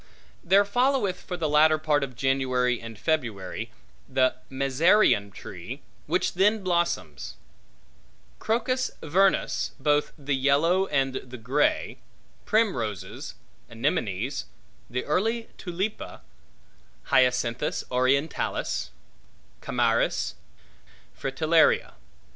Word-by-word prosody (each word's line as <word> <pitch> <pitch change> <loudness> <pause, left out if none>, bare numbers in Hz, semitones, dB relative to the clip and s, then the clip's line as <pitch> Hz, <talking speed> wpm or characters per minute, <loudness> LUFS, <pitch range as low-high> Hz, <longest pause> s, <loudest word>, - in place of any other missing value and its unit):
There 195 +3 +5
followeth, 245 -3 +1
for 180 - -5
the 165 -2 -1
latter 155 +1 +5
part 150 -2 +1
of 130 -3 -5
January 130 -2 +1
and 115 -1 -9
February, 115 - -2 0.4
the 130 -1 +3 0.2
mezereon 135 - +3
tree, - - -9 0.3
which - - 0
then 205 +3 +2
blossoms; 75 - -1 1.0
crocus 255 +3 0
vernus, 190 +5 +1
both 145 +1 +1
the 145 -1 -2
yellow 155 +8 +2
and 135 -4 0
the 130 0 -9
grey; 130 +6 0 0.5
primroses, 125 - -1 0.3
anemones; - - -2 0.4
the 125 +1 -3
early 225 +9 0
tulippa; 190 +4 -4 0.9
hyacinthus 125 -2 +2
orientalis; 130 - 0 0.7
chamairis; - - +1 0.8
fritellaria. 155 +4 +2
145 Hz, 90 wpm, -26 LUFS, 130-185 Hz, 1.0 s, There